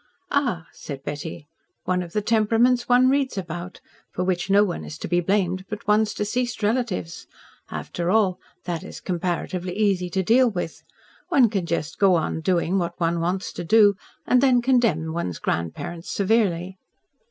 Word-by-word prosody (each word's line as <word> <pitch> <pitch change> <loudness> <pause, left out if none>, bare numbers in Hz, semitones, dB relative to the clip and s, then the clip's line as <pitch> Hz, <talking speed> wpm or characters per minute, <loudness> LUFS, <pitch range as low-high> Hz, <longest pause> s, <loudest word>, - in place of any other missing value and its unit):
"Ah!" 245 - 0
said 140 -2 -8
Betty. 145 +1 -6 0.4
"One 180 0 0
of 170 -2 -8
the 210 - 0
temperaments 230 +3 +2
one 250 +1 +5
reads 270 -3 +1
about 175 0 -6 0.3
for 180 - -2
which 180 0 -1
no 200 +1 +6
one 175 - -3
is 75 0 -8
to - - -5
be 175 - +2
blamed 185 0 0
but 210 +1 -7
one's 210 0 +2
deceased 245 +2 -2
relatives. 210 -7 -1 0.4
After 170 0 -4
all, 195 -3 +2 0.2
that 175 -1 -4
is - - -9
comparatively 180 +1 -3
easy 195 -4 +1
to 190 +1 -1
deal 245 +5 +4
with. 175 -5 -5 0.5
One 245 -6 +4
can 190 -5 -1
just 165 -1 -3
go 195 -3 +5
on 160 0 -1
doing 180 +2 +1
what 170 -1 -3
one 170 0 +1
wants 180 +3 -2
to - - -5
do 205 +2 +5 0.3
and 250 - +4
then 255 -3 +4
condemn 230 -12 +2
one's 90 - -3
grandparents 165 - -4
severely." 190 -3 0
185 Hz, 165 wpm, -24 LUFS, 170-220 Hz, 0.5 s, no